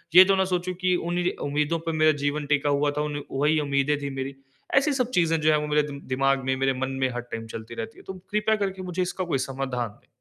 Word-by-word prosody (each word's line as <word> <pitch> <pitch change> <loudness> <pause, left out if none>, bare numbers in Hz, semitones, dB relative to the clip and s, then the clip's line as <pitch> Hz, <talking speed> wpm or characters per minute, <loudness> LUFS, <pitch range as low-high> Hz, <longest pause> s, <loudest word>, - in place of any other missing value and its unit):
ये 185 +1 +11
तो 195 0 +3
ना 190 - +3
सोचूँ 180 0 -1
कि 185 -1 +3
उन्हीं 175 +1 0 0.2
उम्मीदों 150 +3 0
पर - - +2
मेरा 155 0 +5
जीवन 145 +1 0
टिका 145 0 +2
हुआ 145 +1 +2
था, 150 +1 -2
उन 145 -1 -2
वहीं 150 +3 +2
उम्मीदें 140 +1 +1
थी 140 - -3
मेरी। 135 +1 -4 0.4
ऐसी 285 +1 +4
सब 255 -2 0
चीज़ें 165 -1 +2
जो 155 +1 +4
हैं 150 - +4
वो 150 - -3
मेरे 150 0 +3
दि 140 -1 -6 0.2
दिमाग 135 0 +2
में, 130 0 +1
मेरे 135 0 +2
मन 130 +1 -2
में 130 - +3
हर 120 - -3
टाइम 115 -2 -7
चलती 115 +1 -8
रहती 130 +7 -6
है। - - -15
तो 190 - -4 0.2
कृपया 215 +1 +2
करके 195 -2 -2
मुझे 180 0 -2
इसका 185 +1 -2
कोई 155 -6 0
समाधान 130 -3 -2
दे। - - -31
150 Hz, 260 wpm, -26 LUFS, 135-175 Hz, 0.4 s, ये